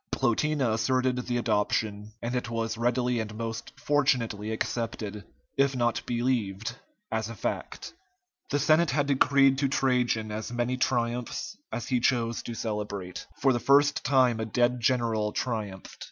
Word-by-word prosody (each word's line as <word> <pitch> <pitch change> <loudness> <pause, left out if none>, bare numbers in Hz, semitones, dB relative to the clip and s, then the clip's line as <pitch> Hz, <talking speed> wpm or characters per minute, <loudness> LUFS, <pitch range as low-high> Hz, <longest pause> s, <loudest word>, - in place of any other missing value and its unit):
Plotina 135 0 +1
asserted 130 +3 +1
the 120 -1 0
adoption, 105 -2 0
and 120 +1 -2
it 125 -1 -2
was 115 -1 -2
readily 120 +1 +1
and 110 -1 -4
most 115 0 -5
fortunately 125 -7 +1
accepted, 110 -2 -3 0.3
if 140 0 +3
not 120 -2 +1
believed, 115 -4 -1 0.4
as 110 0 -1
a 115 - -7
fact. - - -4 0.6
The 145 - +1
Senate 155 +3 +4
had 145 -2 +1
decreed 135 -1 +4
to 140 - +2
Trajan 125 -5 +1
as 110 +2 -4
many 120 +1 0
triumphs 120 - -1 0.2
as 120 - -4
he 125 -2 +2
chose 120 -1 +1
to 120 - -6
celebrate. 105 -5 -4
For 135 -1 +4
the 120 - 0
first 145 +3 +4
time 130 -4 +3
a 110 - -1
dead 120 +2 +2
general 115 -3 +1
triumphed. 105 -6 -4
120 Hz, 150 wpm, -28 LUFS, 110-130 Hz, 0.6 s, Senate